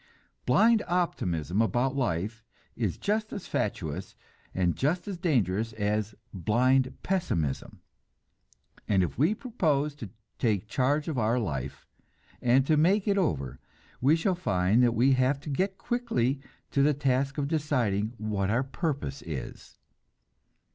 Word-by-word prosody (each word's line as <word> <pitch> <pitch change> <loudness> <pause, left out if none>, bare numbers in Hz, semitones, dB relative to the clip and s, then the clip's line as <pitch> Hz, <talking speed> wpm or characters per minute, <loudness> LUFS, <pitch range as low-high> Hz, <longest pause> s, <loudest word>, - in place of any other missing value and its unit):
Blind 220 - +5
optimism 95 - 0
about 125 +4 +1
life 110 -2 -2 0.3
is 110 -7 -1
just 215 +1 -1
as 200 - -6
fatuous - - -3 0.4
and 90 -2 0
just 175 +8 0
as 190 -4 -5
dangerous 115 - +1
as 105 0 -1 0.2
blind 130 +8 +2
pessimism, 85 - -2 1.1
and 95 -3 +3
if 85 - -4
we 165 +10 +3
propose 155 - 0
to 115 -8 -8 0.3
take 105 -4 0
charge 145 +6 +1
of 155 -5 -2
life, 110 - -1 0.6
and 125 +2 +4
to 155 +1 +3
make 190 +7 +3
it 200 -1 +3
over, 70 - -1 0.4
we 140 +5 +5
shall 175 +4 +1
find 100 - +2
that 120 -1 +3
we 125 +5 +4
have 130 +2 +2
to 150 - -6
get 190 +6 -1
quickly 225 - -1 0.3
to 140 - +2
the 145 +1 +4
task 135 0 0
of 145 -1 0
deciding 125 -9 0
what 105 -3 -1
our 120 +5 +2
purpose 140 0 -3
is. 80 -6 -7
130 Hz, 135 wpm, -28 LUFS, 105-155 Hz, 1.1 s, Blind